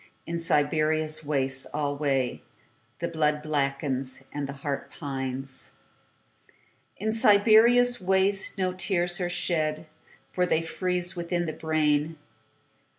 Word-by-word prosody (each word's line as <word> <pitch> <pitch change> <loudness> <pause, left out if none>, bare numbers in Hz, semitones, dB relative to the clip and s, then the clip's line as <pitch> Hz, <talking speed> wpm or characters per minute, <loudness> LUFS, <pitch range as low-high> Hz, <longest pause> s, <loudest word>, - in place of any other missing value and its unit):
In 170 0 -3
Siberia's 155 0 +1
wastes 135 -3 0
alwayThe 140 -1 -4
blood 150 -1 +1
blackens, 140 -3 -2
the 140 -1 -4
heart 140 0 -5
pines.In 135 - -7
Siberia's 225 +3 +5
wastesNo 190 0 0
tears 180 -1 0
are 175 - -1
shed, 160 -3 -1 0.5
For 180 -1 0
they 165 -1 +1
freeze 180 +2 -1
within 175 0 -2
the 155 - -4
brain. 155 0 0
155 Hz, 90 wpm, -27 LUFS, 140-180 Hz, 0.5 s, Siberia's